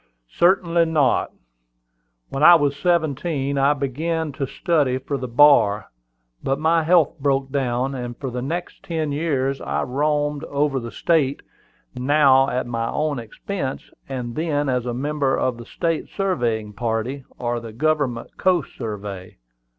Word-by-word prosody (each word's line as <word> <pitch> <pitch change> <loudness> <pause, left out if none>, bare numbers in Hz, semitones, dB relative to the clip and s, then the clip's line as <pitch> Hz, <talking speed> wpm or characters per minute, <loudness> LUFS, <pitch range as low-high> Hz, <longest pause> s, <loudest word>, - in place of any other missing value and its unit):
"Certainly 170 -1 +3
not. 155 -5 +2 1.0
When 135 - -4
I 175 +3 +9
was 145 -3 +2
seventeen 145 -3 0
I 140 +2 +4
began 155 +4 -2
to 135 0 -3
study 145 -4 +1
for 135 +2 -4
the 130 -2 -4
bar; 120 -5 +4 0.5
but 135 - 0
my 160 +2 +2
health 165 -2 +3
broke 135 -1 0
down, 130 -1 -1
and 120 -2 -5
for 130 - -5
the 125 0 -4
next 170 +7 -4
ten 160 -3 -2
years 140 -3 -1
I - - -1
roamed 145 +2 0
over 140 -1 0
the 115 -1 -6
state, 145 -5 +1 0.5
now 135 0 +4
at 125 +1 -1
my 115 -1 -2
own 150 -3 -1
expense, 130 - -5 0.2
and 125 -3 -4
then 145 -1 -1
as 125 -1 -1
a 120 - -2
member 140 0 0
of 125 -2 0
the 120 - -10
state 165 +3 -2
surveying 120 - -1
party, 115 +4 -2
or 120 0 -2
the 115 -1 -9
government 140 -1 -1
coast 180 -4 +1
survey. 100 -5 -6
140 Hz, 150 wpm, -22 LUFS, 125-155 Hz, 1.0 s, I